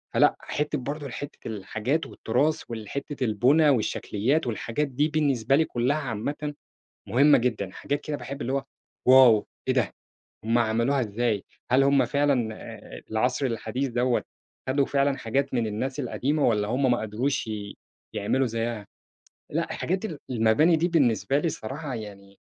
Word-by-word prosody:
فلأ - - +5
حتة 150 +1 -2
برضه 145 +2 -5
حتة 145 +3 -7
الحاجات 110 +8 -2
والتراث 150 +7 0
والحتة 130 +5 -5
البُنى 130 +8 +4
والشكليات 125 +2 0
والحاجات 120 +5 -2
دي 140 +3 +1
بالنسبة 140 -6 +2
لي 160 +2 +3
كلها 125 +4 0
عامةً 145 +3 -3 0.6
مهمة 140 +7 +5
جدًا، 115 -6 -1
حاجات 145 +9 -3
كده 150 -1 -4
باحب 140 0 -6
اللي 130 - -2
هو 135 0 -1 0.4
واو! 130 -5 +7 0.2
ايه - - +3
ده! - - +1 0.5
هُم 115 +2 +2
عملوها 120 +4 +2
إزاي؟ 110 -2 -1 0.3
هل 130 +2 +5
هُم 140 0 +4
فعلًا 140 -6 +1
آآ - - -10
العصر 125 +5 +1
الحديث 125 +3 -2
دوّة 125 +1 +1 0.5
خدوا 140 +1 +2
فعلًا 140 0 +1
حاجات 135 +5 -1
من 120 -3 +1
الناس 130 +7 -3
القديمة، 140 +3 0
والّا 105 -3 +1
هُم 130 +3 +2
ما 120 - +1
قدروش 115 +5 -1
ي 105 -2 -6 0.4
يعملوا 130 +6 +1
زيها؟ 115 -2 -3 0.6
لأ - - -1
حاجات 185 +4 -2
ال 165 -9 -4
المباني 120 +8 +4
دي 170 +3 +1
بالنسبة 135 - +2
لي 165 +3 0
صراحة 135 +2 -5
يعني 100 -3 -9
130 Hz, 150 wpm, -26 LUFS, 110-145 Hz, 0.6 s, واو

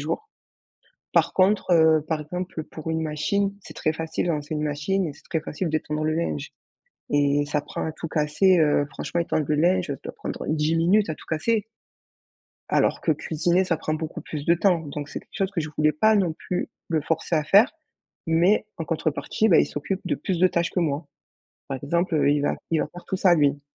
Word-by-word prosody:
jours. 435 0 -4 0.8
Par - - +3
contre, 190 0 +3
heu, 160 -2 +5
par 160 -2 0
exemple 175 0 -5
pour 155 +1 -8
une 160 0 -1
machine, 180 +6 0
c'est 190 - -12
très 155 - 0
facile 160 +1 -3
de - - +1
lancer 150 0 -3
une 150 - -2
machine 150 +6 0
et 150 - -4
c'est - - -18
très 160 - 0
facile 165 +3 -3
d'étendre 155 0 -2
le 155 0 +1
linge. 80 - -3 0.6
Et 145 0 +2
ça 145 0 -1
prend - - -4
à 160 - -3
tout 165 - -6
casser, 155 +5 +3
heu, 150 -2 +3
franchement, 170 - -3
étendre 155 -3 -1
le 150 - +2
linge, 180 +3 +3
ça 140 - -1
doit - - -5
prendre - - -6
10 155 +1 +1
minutes 185 +5 +3
à - - -2
tout - - -15
casser? 210 +8 0 1.0
Alors - - +2
que 160 - +2
cuisiner, 170 +5 +1
ça 170 -3 0
prend 155 0 -2
beaucoup 160 +1 -5
plus 150 -1 -6
de 170 - +4
temps. 175 -1 +2
Donc, 145 -1 -6
c'est - - -6
quelque - - -15
chose 195 -1 0
que 185 - -1
je 155 - -3
voulais 155 0 +3
pas 215 +8 +4
non 185 -5 +2
plus 180 +3 -4 0.2
le 160 -2 +1
forcer 165 +2 -1
à 155 - +1
faire, 205 - +6 0.6
mais 175 +6 +3
en 165 - -3
contrepartie, 165 +7 0
bah, 170 - +6
il - - +4
s'occupe 185 +6 -3
de - - -1
plus 185 -3 -2
de 185 - +6
tâches 170 -1 0
que 180 - -1
moi. 150 -2 -1 0.6
Par 135 - -3
exemple, 170 +1 +1
il 145 0 +2
va 145 - 0 0.2
il 160 - +2
va - - -2
faire 175 +3 -12
tout 190 - -2
ça, 180 -2 +5
lui. 145 -2 +2
160 Hz, 220 wpm, -24 LUFS, 150-180 Hz, 1.0 s, faire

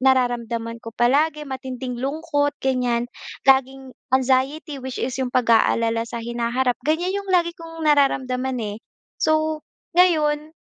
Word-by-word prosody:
nararamdaman 240 -3 +1
ko 230 -1 -10
palagi, 300 +5 +2
matinding 260 -2 -5
lungkot 290 +1 -1
ganyan. 250 -3 +1 0.4
Laging 265 -1 +2 0.2
anxiety 265 +3 +1
which 260 0 -6
is 260 - -2
yung 255 - 0
pag-aalala 230 -1 +2
sa 230 -1 -5
hinaharap 240 +1 -1
ganyan 345 +4 +1
yung 395 - -12
lagi 345 -2 +2
kong 330 -1 -9
nararamdaman, 265 -3 +2
eh. 205 0 -4 0.4
So 315 0 +1 0.3
ngayon 315 -3 +2
265 Hz, 125 wpm, -22 LUFS, 245-305 Hz, 0.4 s, palagi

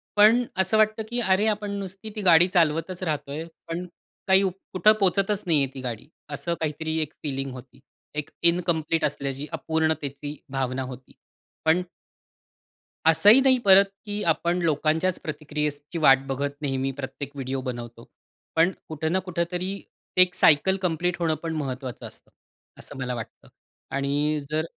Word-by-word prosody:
पण 220 +4 +6
असं 190 +3 +2
वाटतं, 215 0 +2
की 240 - 0
"अरे 195 -1 +3
आपण 210 -1 -1
नुसती 195 +1 -6
ती 210 - -4
गाडी 175 -2 +6
चालवतच 165 +2 +1
राहतोय. 150 -1 -3 0.2
पण 170 +2 -4 0.4
काही 190 0 +6
उप 185 -2 -1 0.2
कुठं 200 +4 +5
पोहचतच 195 +2 +1
नाही 165 -4 +3
आहे - - 0
ती 135 - -7
गाडी." 120 0 -5 0.2
असं 150 +4 -3
काहीतरी 160 +1 -2
एक 155 0 -4
फीलिंग 135 -2 -3
होती. 125 0 -12 0.4
एक 150 -1 -3
इनकंप्लीट 170 -2 +2
असल्याची, 140 -1 -3
अपूर्णतेची 155 -2 -2 0.2
भावना 130 -1 -1
होती. 130 0 -10 0.5
पण 165 +3 +4 1.3
असंही 205 +10 +7
नाही 260 -1 +4
परत 195 0 +8 0.2
की 205 0 -3
आपण 170 +2 -1
लोकांच्याच 160 +3 +1
प्रतिक्रियेची 150 +1 -4
वाट 135 -3 +5
बघत 140 +1 -2
नेहमी 135 -1 -1
प्रत्येक 135 +1 -6
व्हिडिओ 135 -1 -3
बनवतो. 120 -2 -7 0.5
पण 165 +3 +5 0.2
कुठे 160 0 -2
ना 180 +4 +1
कुठेतरी 180 +2 -2 0.4
एक 185 -1 +5
सायकल 160 +6 +4
कंप्लीट 180 0 0
होणं 165 -2 +1
पण 165 -1 -3
महत्वाचं 130 -3 -5
असतं. - - -13 0.5
असं - - -10
मला 125 -1 -2
वाटतं. 115 -2 -9 0.4
आणि 145 +2 0
जर 155 +1 0
160 Hz, 150 wpm, -25 LUFS, 140-185 Hz, 1.3 s, परत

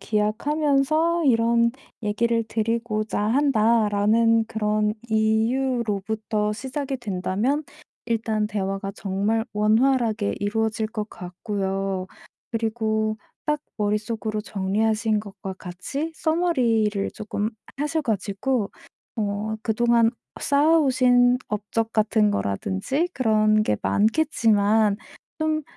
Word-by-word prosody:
기약하면서 295 +9 +1
이런 235 -1 +3 0.3
얘기를 230 +2 +1
드리고자 220 -1 -1
한다.'라는 225 -2 +3
그런 210 -1 0 0.2
이유로부터 220 -2 0
시작이 270 +3 -4
된다면 215 +6 -1 0.4
일단 220 -2 0
대화가 195 -1 -3
정말 205 +3 -1
원활하게 220 0 +2
이루어질 220 +1 0
것 215 -1 -5
같고요. 190 +1 -3 0.4
그리고 220 -1 -1 0.3
딱 300 -1 0 0.2
머릿속으로 215 +1 -1
정리하신 215 +2 0
것과 195 -2 -7
같이 270 - -5
summary를 240 - +1
쪼끔 210 0 -3 0.3
하셔 300 +3 -1
가지고 215 -1 -1 0.5
어 210 +1 -2
그동안 230 0 +3 0.3
쌓아오신 260 -5 +4
업적 220 +2 -2
같은 215 -1 +3
거라든지 100 - -1
그런 215 -3 +3
게 105 - +1
많겠지만 215 -4 +2 0.4
좀 310 -1 0
220 Hz, 245 characters per minute, -24 LUFS, 210-245 Hz, 0.5 s, 쌓아오신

